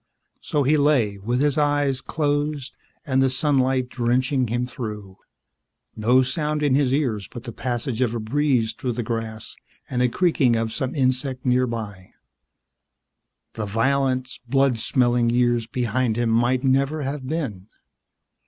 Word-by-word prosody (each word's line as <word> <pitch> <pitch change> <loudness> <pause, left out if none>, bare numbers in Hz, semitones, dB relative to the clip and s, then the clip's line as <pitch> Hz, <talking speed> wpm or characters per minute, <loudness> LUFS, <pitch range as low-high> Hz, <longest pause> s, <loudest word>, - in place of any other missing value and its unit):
So 145 - -1
he 150 +4 +3
lay, 130 -9 +2
with 120 +7 0
his 150 0 +1
eyes 145 -2 +1
closed 145 -2 -2 0.3
and 135 -3 +2
the 135 - +3
sunlight 130 -2 +1
drenching 125 +2 0
him 120 +2 -1
through, 105 -6 -7 0.8
no 125 +4 +3
sound 150 +3 -2
in 145 -3 +3
his 135 -1 +2
ears 120 -9 0
but 120 - -9
the 120 - -6
passage 120 +1 -3
of 120 -2 +1
a - - -2
breeze 120 -1 +1
through 125 +1 -3
the 120 +1 -3
grass 110 -1 -4 0.3
and 125 -1 -1
a 125 - +3
creaking 145 -6 +2
of 115 -1 -1
some 130 +2 -3
insect 130 -1 0
nearby 115 -7 -1 1.4
the 110 -2 -4
violent, 130 +3 0
blood 135 -3 +2
smelling 120 +1 +2
years 120 -1 +2
behind 120 -1 -1
him 120 -1 +1
might 120 +3 +2
never 140 +3 +1
have 135 -1 -4
been. 130 - -4
125 Hz, 145 wpm, -23 LUFS, 115-140 Hz, 1.4 s, he